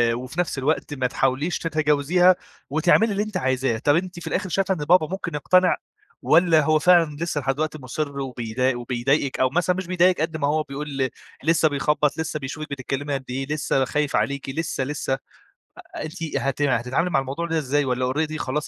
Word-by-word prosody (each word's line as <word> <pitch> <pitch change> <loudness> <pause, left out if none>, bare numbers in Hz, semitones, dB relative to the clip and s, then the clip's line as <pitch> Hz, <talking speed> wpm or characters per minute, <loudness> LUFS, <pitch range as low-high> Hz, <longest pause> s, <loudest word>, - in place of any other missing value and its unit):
وفي 130 +7 -6
نفْس 175 -5 -1
الوقت 145 +2 -1
ما 130 -3 0
تحاوليش 135 +6 0
تتجاوزيها، 155 +3 +3 0.3
وتعملي 175 +9 +3
اللي 200 +1 0
أنت 215 -3 -4
عايزاه، 130 -5 0
طب 145 +5 +3
أنتِ 180 +1 -2
في - - -8
الآخر 185 0 -2
شايفة 195 +2 +1
إن - - -5
بابا 170 0 +4
ممكن 180 -4 -4
يقتنع، 185 +5 +3 0.4
والّا 165 -2 +5
هو 155 +1 +3
فعلًا 170 -3 +4
لسّه 165 -3 -2
لحد 135 0 0
دلوقتي 155 +1 -2
مُصِر 140 +2 -4
وبيضايق 125 -1 -1
وبيضايقِك، 130 +3 0
أو 130 - +3
مثلًا 175 +5 +1
مش 190 -1 -4
بيضايقِك 180 -1 +3
قد 160 0 -1
ما 145 -2 0
هو 155 +1 +1
بيقول 140 -2 -3 0.3
لسّه 160 +1 +3
بيخبّط، 150 +1 +1
لسّه 160 -1 -2
بيشوفِك 150 +3 -6
بتتكلّمي 140 +1 -3
قد 135 -1 -3
إيه، 135 +2 -3
لسّه 145 -3 +1
خايف 150 +2 -1
عليكِ 140 -1 -1
لسّه، 145 -1 -2
لسّه، 135 0 -2 0.6
أ - - -9
أنتِ 160 +3 -7
هت 135 +1 -1
هتتعاملي 135 +5 +1
مع 135 - +2
الموضوع 135 +6 -4
ده 165 -1 -1
إزاي؟ 145 0 +1
والّا 125 0 0
already 155 +2 -1
خلاص؟ 150 +1 -2
150 Hz, 190 wpm, -23 LUFS, 135-165 Hz, 0.6 s, والّا